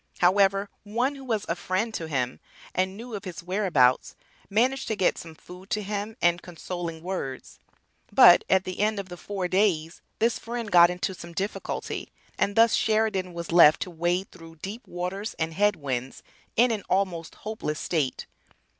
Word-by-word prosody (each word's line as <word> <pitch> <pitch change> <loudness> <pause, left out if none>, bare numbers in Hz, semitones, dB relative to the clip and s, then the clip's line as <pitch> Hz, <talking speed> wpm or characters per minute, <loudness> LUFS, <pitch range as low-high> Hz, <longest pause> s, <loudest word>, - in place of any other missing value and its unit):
However, 195 +2 +3
one 240 +7 -1
who 275 -1 -10
was 225 -5 -1
a - - +1
"friend" 190 +5 -2
to 165 -6 -4
him, 130 -4 -2 0.3
and 190 +1 -1
knew 235 +1 -9
of 205 -2 -5
his 175 -3 -7
whereabouts, 175 -10 +2 0.3
managed 250 +6 +1
to 220 - -1
get 190 -3 +2
some 165 -1 -10
food 180 +4 -13
to 210 - -1
him 210 +2 -4
and 175 +1 +3
consoling 170 -1 -6
words; 175 -8 -5 0.5
but - - +8
at 190 -1 +4
the 185 -1 -6
end 215 +1 +1
of 195 -1 -6
the 175 - -7
four 190 +1 -4
days 180 -4 +1 0.2
this 230 +1 +1
friend 230 -2 -5
got 175 -1 +8
into 180 +2 -2
some 170 -1 -10
difficulty 195 +4 -4 0.3
and 200 - +1
thus 230 0 +5
Sheridan 215 -5 +1
was 170 0 -5
left 165 -3 +7
to 185 - -10
"wade 175 +3 -1
through 165 -2 -13
deep 200 +9 -8
waters 180 +4 -4
and 160 0 -2
head 205 +3 +3
winds" 130 -4 -4 0.3
in 240 +2 +4
an 215 -2 -1
almost 180 -4 -1
hopeless 210 -8 -4
state. 150 -7 -1
185 Hz, 175 wpm, -26 LUFS, 170-210 Hz, 0.5 s, but